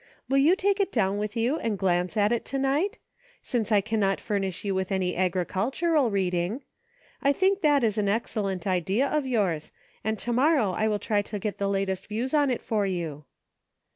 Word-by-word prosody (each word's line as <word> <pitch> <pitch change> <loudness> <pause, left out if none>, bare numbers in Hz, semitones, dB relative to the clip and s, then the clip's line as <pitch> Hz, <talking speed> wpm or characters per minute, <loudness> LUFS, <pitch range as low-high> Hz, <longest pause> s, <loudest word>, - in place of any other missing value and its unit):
Will 270 +1 +3
you 315 +7 +5
take 400 +1 +1
it 400 - +1
down 205 -3 +1
with 210 +2 -3
you 245 +7 +1
and 225 -3 -1
glance 180 +1 0
at 205 +1 +3
it 235 - 0
to 275 - -3
night? 290 - 0 0.2
— - - -30
since 230 -3 -2
I 205 -2 +5
cannot 205 -2 0
furnish 195 -3 -3
you 200 - 0
with 190 0 -2
any 185 -2 0
agricultural 215 - +1
reading. 190 +4 -1 0.6
I 280 - +4
think 385 +6 +2
that 290 -4 +3
is 215 -1 +1
an 200 -1 +1
excellent 200 -4 -2
idea 190 - +1
of 300 -1 -1
yours, 195 -11 0 0.3
and 220 +1 -1
to 240 - -3
morrow 265 - +3
I 215 +4 0
will 210 -1 +1
try 205 0 0
to 210 +1 -6
get 205 -1 -4
the 200 0 0
latest 195 -1 -1
views 235 +6 -3
on 290 -2 +3
it 250 - -2
for 215 -2 0
you." 165 -6 -4
210 Hz, 200 wpm, -26 LUFS, 190-265 Hz, 0.6 s, you